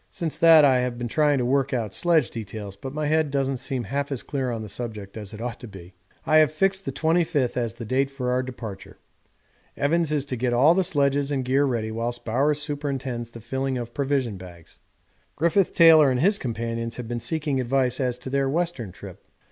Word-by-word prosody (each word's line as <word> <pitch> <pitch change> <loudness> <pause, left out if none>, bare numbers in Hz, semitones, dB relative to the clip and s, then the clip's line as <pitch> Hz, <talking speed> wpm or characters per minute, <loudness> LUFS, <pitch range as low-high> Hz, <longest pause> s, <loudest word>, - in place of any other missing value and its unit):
Since 170 -5 -4
that 160 -3 +8
I 130 -2 +4
have 125 -1 -2
been 120 0 -3
trying 150 +3 +2
to 125 - 0
work 135 +1 +1
out 110 -5 -3
sledge 165 - +2
details, 105 -3 -7
but 130 +7 -7
my 150 +2 -3
head 155 0 +2
doesn't 135 -1 -1
seem 130 -1 -3
half 140 +3 -3
as 135 - -3
clear 135 -3 -2
on 115 -2 -4
the - - -7
subject 105 -2 -6
as 105 -3 -7
it 105 - -9
ought 120 +1 -5
to 120 - -9
be. 95 -3 -12 0.3
I 155 - +4
have 155 -2 +5
fixed 190 +4 0
the - - -2
25th 160 -5 +1
as 115 -2 -2
the 120 -1 -7
date 135 +4 +1
for 130 -2 -3
our 125 +1 +1
departure. 120 -6 -8 0.8
Evans 160 +2 +1
is 145 -2 0
to 135 - -4
get 125 0 -1
all 140 +7 +5
the 190 +2 +2
sledges 140 -3 +1
and 135 -3 -1
gear 135 +3 +2
ready 115 -5 -2
whilst 120 +2 -4
Bowers 140 +6 +1
superintends 140 -5 -4
the 115 0 -11
filling 130 +3 -2
of 120 -1 -6
provision 135 -6 -1
bags. 90 -3 -13 0.6
Griffith 170 +4 +1
Taylor 160 -4 +7
and 125 -1 0
his 200 +7 +3
companions 115 -1 -3
have 125 -2 -6
been 120 0 -3
seeking 145 +2 -1
advice 125 0 0
as 125 -2 -1
to 125 +1 -8
their 135 0 +1
Western 160 - -2
trip. - - -12
130 Hz, 215 wpm, -24 LUFS, 120-145 Hz, 0.8 s, that